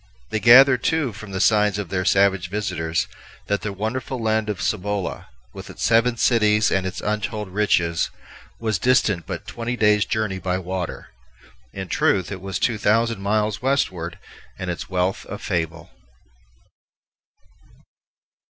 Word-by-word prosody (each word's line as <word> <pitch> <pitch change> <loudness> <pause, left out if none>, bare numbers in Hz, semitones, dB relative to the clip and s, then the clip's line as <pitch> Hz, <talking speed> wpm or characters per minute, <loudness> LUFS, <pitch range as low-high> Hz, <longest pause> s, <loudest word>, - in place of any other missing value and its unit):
They 110 - 0
gathered, 130 +3 +7
too, 160 -8 0
from 110 0 -10
the 95 - -3
signs 105 -1 +3
of 100 -4 -4
their 90 0 -1
savage 95 -2 +3
visitors, 90 -5 -2 0.4
that 100 0 -1
the 105 - -3
wonderful 115 +6 -4
land 110 -1 0
of 105 - -3
Cibola, 105 -1 -2 0.3
with - - -9
its - - -7
seven 115 +1 +3
cities 105 -3 +3
and 95 -1 +1
its 95 - -5
untold 105 -1 -3
riches, 85 -4 +1 0.5
was 110 -5 -1
distant 105 -6 +2
but - - -5
twenty 120 +1 -4
days' 105 -2 +3
journey 110 -3 -2
by 90 -1 -1
water. 90 -1 -5 0.6
In 95 -1 -6
truth, 95 0 +1
it 95 -2 -6
was 95 0 -3
two 115 -3 0
thousand 115 0 +1
miles 105 +1 0
westward, 95 -11 -1 0.4
and 90 -1 -3
its 80 -3 -6
wealth 90 0 -1
a 105 - -5
fable. 85 -4 -3
105 Hz, 145 wpm, -22 LUFS, 95-110 Hz, 0.6 s, gathered